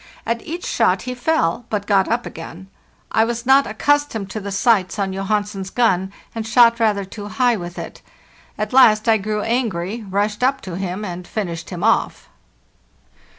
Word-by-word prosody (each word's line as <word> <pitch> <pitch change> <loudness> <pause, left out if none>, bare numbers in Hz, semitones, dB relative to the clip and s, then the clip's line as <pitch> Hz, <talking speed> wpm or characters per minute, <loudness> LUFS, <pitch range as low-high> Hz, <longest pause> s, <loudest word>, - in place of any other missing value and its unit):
At 230 0 -1
each 340 +3 -6
shot - - +1
he 250 - -4
fell, 245 - 0
but 205 -2 -2
got 195 -2 +3
up 235 +1 0
again. 165 +3 -9 0.4
I 220 - +3
was 235 +1 -3
not 270 +2 +5
accustomed 220 -2 0
to 215 - -4
the 200 -1 -6
sights 200 -1 +2
on 195 -2 -1
Johansen's 195 0 -2
gun, 190 -5 +1 0.2
and 225 -1 -4
shot 235 +1 +5
rather 210 -3 +1
too 205 +2 -8
high 245 +2 +2
with 175 -3 -7
it. - - -8 0.6
At 215 +3 -3
last 220 -4 +6
I 225 -1 +5
grew 210 +1 -2
angry, 225 -3 -2
rushed 205 +3 -1
up 270 +2 +2
to 180 -3 -7
him, 190 +2 -4
and 175 -1 -6
finished 170 -6 -4
him 180 0 -6
off." 225 +1 +1
215 Hz, 175 wpm, -20 LUFS, 190-235 Hz, 0.6 s, last